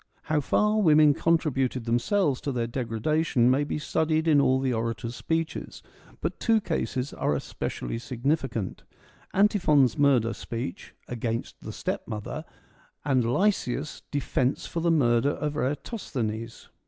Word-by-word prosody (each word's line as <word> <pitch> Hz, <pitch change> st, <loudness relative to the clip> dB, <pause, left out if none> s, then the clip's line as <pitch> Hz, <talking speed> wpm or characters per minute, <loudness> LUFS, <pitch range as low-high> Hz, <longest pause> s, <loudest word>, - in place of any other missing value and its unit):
How 155 Hz, -1 st, +1 dB
far 210 Hz, +9 st, +2 dB
women 155 Hz, -4 st, +6 dB
contributed 135 Hz, -7 st, +1 dB
themselves 135 Hz, -, +1 dB
to 140 Hz, -, -2 dB
their 120 Hz, -3 st, -1 dB
degradation 125 Hz, +2 st, +1 dB
may 135 Hz, +3 st, +2 dB
be 145 Hz, -, -3 dB
studied 160 Hz, +1 st, 0 dB
in 150 Hz, -3 st, +5 dB
all 130 Hz, -1 st, +3 dB
the 130 Hz, -1 st, 0 dB
orators' 115 Hz, +1 st, -3 dB
speeches, 165 Hz, +2 st, -3 dB, 0.4 s
but -, -, -3 dB
two 225 Hz, -1 st, +3 dB
cases 145 Hz, -7 st, -2 dB
are 75 Hz, -, 0 dB
especially 115 Hz, +9 st, -4 dB
significant: 125 Hz, -, -2 dB, 0.5 s
Antiphon's 165 Hz, -, +3 dB
murder 125 Hz, -5 st, +4 dB
speech 115 Hz, -4 st, -6 dB
' -, -, -37 dB
Against 115 Hz, -1 st, -4 dB
the -, -, -7 dB
stepmother,' 105 Hz, -1 st, -4 dB, 0.6 s
and 130 Hz, -5 st, +2 dB
Lysias' 150 Hz, -5 st, 0 dB
* -, -, -48 dB
Defence 135 Hz, -2 st, -1 dB
for 170 Hz, -, -4 dB
the 170 Hz, +1 st, +1 dB
murder 130 Hz, -5 st, +3 dB
of 150 Hz, 0 st, -2 dB
Eratosthenes.' 125 Hz, -, -3 dB
135 Hz, 135 wpm, -27 LUFS, 120-155 Hz, 0.6 s, women